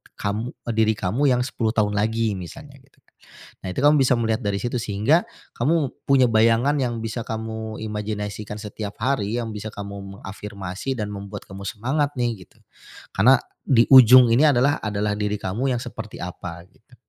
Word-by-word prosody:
kamu 105 +4 -3
d 120 - -7
diri 110 0 +3
kamu 105 +9 -1
yang 125 -2 +3
10 115 -4 -1
tahun 105 -2 +2
lagi 110 0 0
misalnya 135 - -10
gitu, 135 - -29
kan. - - -34 0.5
Nah, - - -3
itu - - -4
kamu 150 +1 +6
bisa 130 -1 +4
melihat 110 -1 0
dari 100 -1 -1
situ, 120 +1 -1
sehingga 115 - +1 0.3
kamu 145 +1 +1 0.2
punya 135 -2 +5
bayangan 115 +6 +3
yang 120 -3 -1
bisa 115 +1 -4
kamu 110 0 -5
imajinasikan 105 -1 -4
setiap 105 -1 -6
hari 115 -3 0
yang 115 -2 -4
bisa 105 +1 -6
kamu 100 -1 -8
mengafirmasi, 100 +4 -6
dan 105 -1 -3
membuat 100 0 -7
kamu 95 +1 -8
semangat, 140 +8 -1
nih, 120 -7 -2
gitu. - - -28 0.6
Karena 125 +6 +6 0.2
di 120 -3 +4
ujung 125 -1 +9
ini 135 +7 +5
adalah 140 +2 +3
adalah 105 0 -1
diri 105 0 -1
kamu 120 +8 -1
yang 120 - -3
seperti 110 -3 -8
apa 90 -1 -7
gitu. 125 +3 -24
110 Hz, 175 wpm, -23 LUFS, 105-125 Hz, 0.6 s, ujung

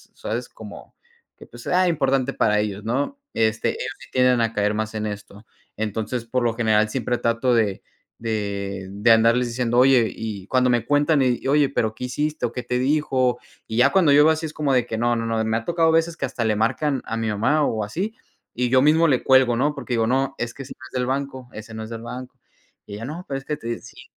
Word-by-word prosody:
¿sabes?, - - -4
como - - -12 0.4
que - - -13
pues - - -13
sea 185 0 +2
importante 135 -4 +1
para 105 0 +2
ellos, 105 -1 -3
¿no? 135 - -2
Este, 110 0 +1
ellos - - -4
sí - - -14
tienden 125 -2 +3
a 115 0 0
caer 105 0 +1
más 110 +1 -3
en 110 0 -2
esto. 105 0 -8 0.3
Entonces, 110 +3 -3
por 125 +1 -1
lo 115 - +1
general 110 -2 +2
siempre 120 0 -1
trato 115 +2 +1
de 110 -5 +1 0.3
de 100 -4 -3
de 105 +4 +3
andarles 115 +2 +4
diciendo: 120 0 -1
"Oye" 125 -5 +5
y 100 -4 -6
cuando 130 -1 +2
me 120 -2 +1
cuentan 145 +1 +3
y: 125 0 0
"Oye, 145 0 +3
pero 110 -5 -1
¿qué 125 - -5
hiciste 150 +2 -2
o - - -9
qué 125 - -5
te 125 +1 -1
dijo?". 130 -3 +1 0.3
Y 110 - -4
ya 135 +3 +5
cuando 175 -7 +4
yo 145 +1 +7
veo 160 - +6
así 160 +1 -4
es 150 - -10
como 145 -3 0
de 125 -2 +2
que 110 - -3
no, 120 +1 +1
no, 115 0 -2
no, 115 0 -1
y - - -1
me 110 0 0
ha 115 - -6
tocado 165 -1 +2
a - - +4
veces 165 0 +1
que - - -1
hasta 115 - -3
le 110 -1 +1
marcan 130 +6 0
a 115 - -3
mi 115 - -2
mamá 130 +9 +1
o 110 -4 -1
así, 185 - -4 0.4
y 125 +1 -1
yo 130 +1 +4
mismo 160 +3 +4
le 130 -5 +1
cuelgo, 130 -2 +4
¿no? 145 +5 +1
Porque 140 -3 -5
digo: 115 -1 +2
"No, 135 +2 0
es 120 0 -4
que 140 - -10
ese 135 - -9
no 130 - -11
es - - -21
del 125 -1 -1
banco, 130 -2 -3
ese 110 +1 -9
no 110 - -6
es 110 - -8
del 115 -1 -6
banco". 125 +1 -8 0.5
Y 100 - -10
ella: 115 +3 -6
"No, 165 +6 -7
pero 135 -1 -3
es 135 - -17
que 150 - -3
te". 115 -1 -5
Sí. - - -13
120 Hz, 250 wpm, -23 LUFS, 110-135 Hz, 0.5 s, yo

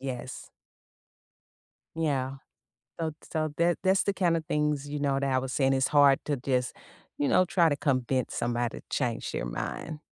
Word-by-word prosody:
Yes. 130 -1 -6 1.5
Yeah. 135 -4 -1 0.6
So 165 -1 -1
ts - - -17
so 155 -2 -1 0.3
that's 190 +1 +3
the 200 - 0
kind 175 -4 +2
of 160 - -3
things, 150 -2 0
you 145 +1 -3
know, 140 -1 +1
that 140 -1 0
I 130 - +3
was 130 0 -3
saying. 135 -1 +2
It's 130 0 +2
hard 145 -2 +6
to 145 - -1
just, 125 -1 -1 0.4
you 145 - +1
know, 185 - +5
try 170 -2 +3
to 145 - 0
convince 130 -3 0
somebody 120 0 -1
to - - -34
change 120 -4 -1
their - - -2
mind. 105 - -5
140 Hz, 175 wpm, -28 LUFS, 130-155 Hz, 1.5 s, hard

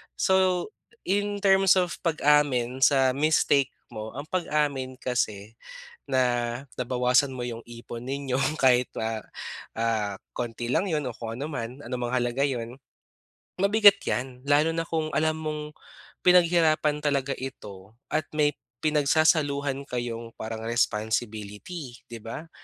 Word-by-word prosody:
So, 185 - +2 0.3
in 205 +1 -1
terms 195 -1 +5
of 180 -2 0
pag-amin 145 -6 +2
sa 135 -1 +5
mistake 140 -1 +2 0.2
mo, 110 +2 -7
ang 140 - -4
pag-amin 145 -7 -1
kasi 115 -4 -3 0.4
na 130 - +1 0.5
nabawasan 125 +2 +2
mo 125 -1 -4
yung 115 -1 -6
ipon 120 0 -9
ninyo 135 0 -3 0.2
kahit 125 -2 +4
na, 110 0 -3 0.5
ah, 110 -4 -1 0.2
konti 120 -1 -4
lang 185 +9 +1
yun 150 -4 -1
o 120 - -5
kung 115 -1 -6
ano 145 - -3
man, 130 -3 -5
anumang 125 -2 -4
halaga 125 +1 0
yun. 120 -4 -2 0.9
Mabigat 205 0 +6
yan 125 0 -3
lalo 150 +3 +4
na 165 - 0
kung 160 -2 -2
alam 155 0 +1
mong 150 -1 -5 0.5
pinaghirapan 165 -4 +4
talaga 140 -2 0
ito 105 -6 -9 0.2
at 155 -1 0
may 150 -1 +2 0.3
pinagsasaluhan 145 -2 +2
kayong 120 -2 -4
parang 110 0 -6
responsibility, 110 - -2
'di 115 - -7
ba? 115 +9 -8
135 Hz, 125 wpm, -26 LUFS, 120-155 Hz, 0.9 s, Mabigat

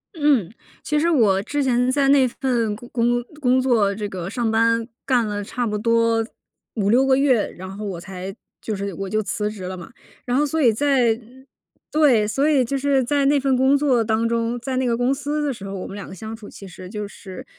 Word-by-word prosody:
嗯， 280 - +2 0.3
其 300 0 0
实 335 +2 +2
我 210 - +3
之 290 +3 -1
前 250 0 +2
在 275 0 +2
那 270 -2 +5
份 235 -4 -1
工 240 +2 -12
工 240 0 +1 0.2
工 255 -1 +3
作 225 -6 +2
这 205 0 -4
个 185 -1 -5
上 235 0 -1
班 230 +1 +2 0.2
干 245 -4 +2
了 205 0 -3
差 240 +3 -3
不 210 0 -2
多 230 0 +2 0.5
5-6 225 +6 +3
个 265 -1 +4
月， 260 -6 +2
然 185 +1 -9
后 210 +1 -6
我 185 -4 -4
才 190 +1 -7 0.3
就 215 - -3
是 200 -1 -4
我 195 +2 -5
就 215 0 0
辞 210 +1 -2
职 205 -3 -8
了 185 +1 -5
嘛。 175 +5 -10 0.3
然 245 0 -1
后 295 - +3
所 320 +3 -2
以 240 -4 +5
在 245 -3 +2 0.7
对， 260 -9 +4
所 275 +8 +1
以 275 -4 +4
就 275 +3 -2
是 270 -1 +2
在 280 +2 +1
那 285 0 +4
份 265 -1 +1
工 265 +2 +4
作 260 -5 +2
当 220 +1 +1
中， 230 +1 -1
在 260 +1 -3
那 260 - +1
个 235 - +1
公 245 +2 +2
司 295 +2 -2
的 275 - -1
时 200 -4 -10
候， 195 0 -6
我 185 - -5
们 195 - -8
两 200 - -7
个 190 - -9
相 220 +4 -7
处 220 -2 -12
其 195 - -11
实 180 0 -11
就 210 -1 -5
是 190 -2 -10
230 Hz, 240 characters per minute, -22 LUFS, 210-265 Hz, 0.7 s, 那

